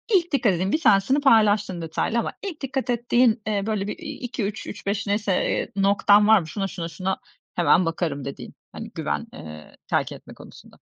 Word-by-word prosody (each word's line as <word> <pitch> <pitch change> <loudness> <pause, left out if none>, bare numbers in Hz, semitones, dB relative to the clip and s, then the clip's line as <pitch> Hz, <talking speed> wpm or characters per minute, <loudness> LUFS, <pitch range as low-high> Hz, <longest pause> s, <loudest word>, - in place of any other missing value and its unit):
İlk 350 -2 +2
dikkat 240 -8 +2
ettiğin, 185 +3 -1
bir 315 - +1
tanesini 210 +6 +4
paylaştın 210 -8 +3
detaylı 165 +8 -1
ama - - -2
ilk 380 -6 -6
dikkat 270 -1 -3
ettiğin, 240 -1 +2
eee, 205 -2 0
böyle, 210 -1 -1
iii, - - -8
2-3, 220 -4 -4
3-5 200 +1 -3
neyse, 205 0 0 0.2
eee, - - -2
noktan 200 +1 +4
var 220 -1 +7
mı? 165 - -7
Şuna 195 +4 -3
şuna 170 -3 -5
şuna 185 +4 -3 0.4
hemen 175 +1 +4
bakarım 165 -4 -2
dediğin, 140 - -7 0.2
hani - - -8
güven, - - -3
ııı, 75 -1 -11
terk - - 0
etme - - -11
konusunda. - - -15
205 Hz, 180 wpm, -24 LUFS, 185-235 Hz, 0.4 s, var